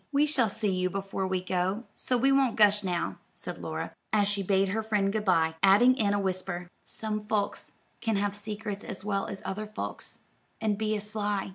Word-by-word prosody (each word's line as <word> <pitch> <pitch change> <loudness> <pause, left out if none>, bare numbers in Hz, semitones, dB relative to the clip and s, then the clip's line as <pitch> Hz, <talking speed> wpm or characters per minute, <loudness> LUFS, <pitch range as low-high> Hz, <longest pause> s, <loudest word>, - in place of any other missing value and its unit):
"We 285 +1 +4
shall 265 -7 +2
see 210 0 0
you 185 0 +1
before 195 0 -3
we 185 -1 -1
go, 185 +4 0
so 250 - +1
we 270 +3 +3
won't 270 -3 +3
gush 210 -1 +5
now," 180 -2 -2 0.2
said - - -7
Laura, - - -4 0.2
as 205 -2 +3
she 205 0 0
bade 195 0 +2
her 220 +3 0
friend 210 -2 +1
good 215 -1 0
by, 165 -4 +3
adding 205 +7 +6
in 205 -5 +2
a - - +1
whisper, 185 -2 -2 0.2
"Some 215 -1 -3
folks 210 -2 -1 0.3
can 225 -2 0
have 200 0 0
secrets 210 0 -5
as 190 - -6
well 200 -2 0
as 195 - -6
other 210 +2 -3
folks, 210 - -6 0.4
and 215 -2 +1
be 215 +1 0
as 210 0 -1
sly. 205 -2 -1
205 Hz, 205 wpm, -29 LUFS, 195-215 Hz, 0.4 s, adding